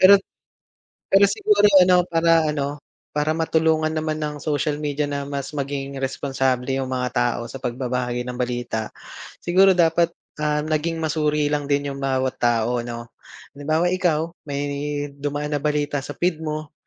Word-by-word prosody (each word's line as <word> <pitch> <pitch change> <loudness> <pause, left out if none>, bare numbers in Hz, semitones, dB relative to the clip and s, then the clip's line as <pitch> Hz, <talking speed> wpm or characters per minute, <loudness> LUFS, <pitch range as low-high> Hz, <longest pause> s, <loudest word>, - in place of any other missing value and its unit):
Pero 200 +2 +9 0.9
pero 195 +1 +5
siguro 420 - +4
ano, 180 0 +5
para 165 -1 +3
ano, 145 -1 -3 0.3
para 150 +1 +1
matulungan 160 -1 +2
naman 155 0 -2
ng 150 -1 -3
social 150 0 -1
media 150 0 -1
na 140 0 -3
mas 140 +1 -4
maging 140 -1 -4
responsable 135 -1 -1
yung 135 -1 -2
mga 125 -1 -1
tao 120 -1 +1
sa 135 +2 -8
pagbabahagi 125 0 -2
ng 125 -1 -5
balita, 120 -3 -2 0.5
siguro 190 +2 +4
dapat, 170 0 +3 0.3
ah, 150 0 0
naging 155 +2 -1
masuri 150 -1 0
lang 145 -1 -1
din 140 0 +1
yung 140 - -8
bawat 130 -1 0
tao, 120 0 +2
'no. 120 0 -7 0.4
Halimbawa 155 +4 0
ikaw, 170 -3 +1 0.2
may 140 0 -2 0.5
dumaan 145 +1 -3
na 145 - 0
balita 150 -1 0
sa 145 - -7
feed 170 -2 0
mo, 155 -1 -4
145 Hz, 155 wpm, -22 LUFS, 135-160 Hz, 0.9 s, Pero